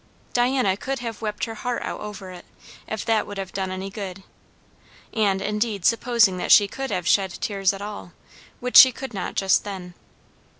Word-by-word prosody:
Diana 245 Hz, -5 st, +2 dB
could 270 Hz, +7 st, -4 dB
have 230 Hz, -3 st, -6 dB
wept 210 Hz, -1 st, -4 dB
her 225 Hz, -, -2 dB
heart 240 Hz, +2 st, -3 dB
out -, -, -5 dB
over 210 Hz, -3 st, -8 dB
it, 180 Hz, -1 st, -11 dB, 0.4 s
if 220 Hz, -, -4 dB
that 225 Hz, -2 st, +1 dB
would 205 Hz, -, -7 dB
have 195 Hz, -1 st, -6 dB
done 190 Hz, -1 st, -2 dB
any 190 Hz, +1 st, -5 dB
good; 195 Hz, -2 st, -7 dB, 0.9 s
and 200 Hz, -3 st, +1 dB
indeed 210 Hz, -2 st, -2 dB
supposing 230 Hz, -5 st, +3 dB
that 180 Hz, -, -2 dB
she 205 Hz, -, +8 dB
could 270 Hz, +5 st, -5 dB
have 180 Hz, -2 st, -2 dB
shed 190 Hz, -3 st, +2 dB
tears 195 Hz, -3 st, 0 dB
at 200 Hz, 0 st, -7 dB
all, 205 Hz, -4 st, -7 dB, 0.5 s
which 250 Hz, 0 st, +3 dB
she 260 Hz, -, +11 dB
could 265 Hz, 0 st, -8 dB
not 190 Hz, -3 st, -4 dB
just 190 Hz, -1 st, +3 dB
then. 185 Hz, -3 st, -7 dB
205 Hz, 185 wpm, -23 LUFS, 190-230 Hz, 0.9 s, she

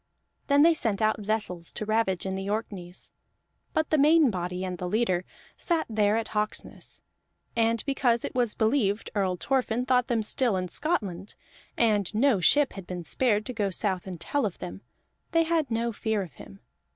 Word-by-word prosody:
Then 285 Hz, 0 st, +5 dB
they 335 Hz, +1 st, +6 dB
sent 225 Hz, -10 st, 0 dB
out 215 Hz, 0 st, +2 dB
vessels 205 Hz, -5 st, -3 dB
to 215 Hz, -, -3 dB
ravage 215 Hz, -5 st, 0 dB
in 190 Hz, 0 st, -2 dB
the 195 Hz, +1 st, -4 dB
Orkneys; 195 Hz, -5 st, -5 dB, 0.6 s
but 315 Hz, -, -1 dB
the 310 Hz, -, +3 dB
main 300 Hz, -2 st, +5 dB
body, 180 Hz, 0 st, -3 dB
and 180 Hz, -2 st, -5 dB
the 180 Hz, -, -3 dB
leader, 185 Hz, -4 st, +1 dB, 0.3 s
sat 335 Hz, -3 st, 0 dB
there 215 Hz, -1 st, +2 dB
at 225 Hz, -1 st, -3 dB
Hawksness, 210 Hz, 0 st, -4 dB, 0.5 s
and 230 Hz, -1 st, +1 dB
because 250 Hz, -4 st, +1 dB
it -, -, -5 dB
was 245 Hz, -3 st, 0 dB
believed 220 Hz, -3 st, +1 dB
Earl 190 Hz, -4 st, 0 dB
Thorfinn 250 Hz, +2 st, 0 dB
thought 250 Hz, -1 st, +2 dB
them 230 Hz, -3 st, 0 dB
still 225 Hz, -1 st, 0 dB
in 180 Hz, -1 st, -3 dB
Scotland, 200 Hz, -, -1 dB, 0.4 s
and 210 Hz, -5 st, +2 dB
no 240 Hz, -2 st, +3 dB
ship 290 Hz, +9 st, +4 dB
had 195 Hz, -3 st, -9 dB
been 180 Hz, -1 st, -5 dB
spared 215 Hz, -, +1 dB
to 250 Hz, -, -4 dB
go 210 Hz, -4 st, 0 dB
south 190 Hz, -1 st, -2 dB
and 180 Hz, -3 st, -6 dB
tell 285 Hz, -, -1 dB
of 200 Hz, -5 st, -2 dB
them, 95 Hz, +2 st, -7 dB, 0.5 s
they 330 Hz, 0 st, +4 dB
had 320 Hz, -3 st, 0 dB
no 230 Hz, +1 st, 0 dB
fear 215 Hz, -1 st, -1 dB
of 175 Hz, -, -11 dB
him. 95 Hz, -, -13 dB
215 Hz, 185 wpm, -27 LUFS, 190-250 Hz, 0.6 s, they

